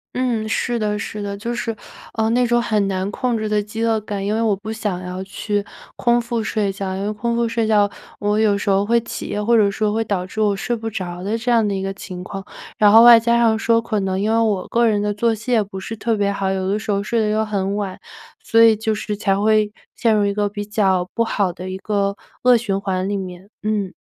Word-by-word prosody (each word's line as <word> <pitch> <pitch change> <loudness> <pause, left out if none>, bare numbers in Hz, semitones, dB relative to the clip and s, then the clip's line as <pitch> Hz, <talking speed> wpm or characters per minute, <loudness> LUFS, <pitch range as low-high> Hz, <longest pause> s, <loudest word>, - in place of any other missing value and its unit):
嗯， 240 -4 0
是 235 +1 -1
的 210 -1 -1
是 210 +1 -5
的， 200 0 -4
就 235 +3 -4
是， 230 -1 -3 0.4
呃， 220 -1 +1
那 245 +1 +3
种 240 0 +3
很 210 -4 +1
难 190 0 -2
控 245 +1 -1
制 215 - -2
的 210 0 +1
饥 215 +2 -5
饿 225 -2 +1
感， 200 -2 -4
因 205 - 0
为 225 - 0
我 220 -3 +2
不 215 +3 -6
想 205 -5 -3
要 180 +1 -5
去 205 +1 -3 0.3
空 240 -1 +3
腹 235 -1 -2
睡 210 -3 -1
觉， 190 -1 -4
因 195 - -3
为 210 - -1
空 235 +3 -2
腹 235 0 +1
睡 230 -1 -1
觉 205 -2 +4 0.3
我 210 +1 +1
有 210 -2 +3
时 200 0 -1
候 195 +1 +3
会 235 +3 +3
起 235 - -6
夜 210 - -2
或 235 +2 +3
者 210 -3 +4
说 210 +1 -1
会 225 +1 0
导 195 -4 -2
致 215 +3 -4
我 205 -2 +2
睡 240 +5 -2
不 225 0 -4
着 180 -4 -5
的 215 +3 -1
这 240 +2 -1
样 230 -2 +4
的 200 - -1
一 190 - -3
个 195 0 -3
情 185 -2 -8
况， 195 +1 -7 0.4
然 210 -1 +6
后 225 +2 +9
外 240 -1 +10
加 235 +1 +2
上 225 -2 +3
说 230 0 +3
可 220 -2 -2
能 190 -1 -1
因 215 +2 0
为 225 - +3
我 210 -5 0
个 235 0 +3
人 210 -2 +2
的 205 0 0
作 225 +2 +1
息 230 +4 -6
也 230 - +4
不 195 -2 -6
是 225 +4 -6
特 225 +1 -1
别 200 -1 +1
好， 195 -1 -1
有 190 -1 -2
的 205 +2 0
时 215 - -9
候 200 -1 +1
睡 230 +3 0
得 215 -1 +1
又 215 +1 +1
很 200 -1 -1
晚， 200 -2 -4 0.4
所 230 0 +4
以 225 -1 +7
就 220 0 -1
是 210 0 -3
才 195 -1 0
会 215 0 +3 0.2
陷 225 -2 +2
入 205 - +2
一 200 - 0
个 205 0 0
比 205 0 -5
较 190 -4 +1
不 230 - +1
好 200 -5 0
的 185 +2 -7
一 185 - -4
个 200 0 -1 0.3
恶 250 -1 +6
循 200 -4 -2
环 190 -1 -1
里 205 - -1
面， 185 -1 -6
嗯。 210 -3 -1
210 Hz, 285 characters per minute, -20 LUFS, 200-225 Hz, 0.4 s, 外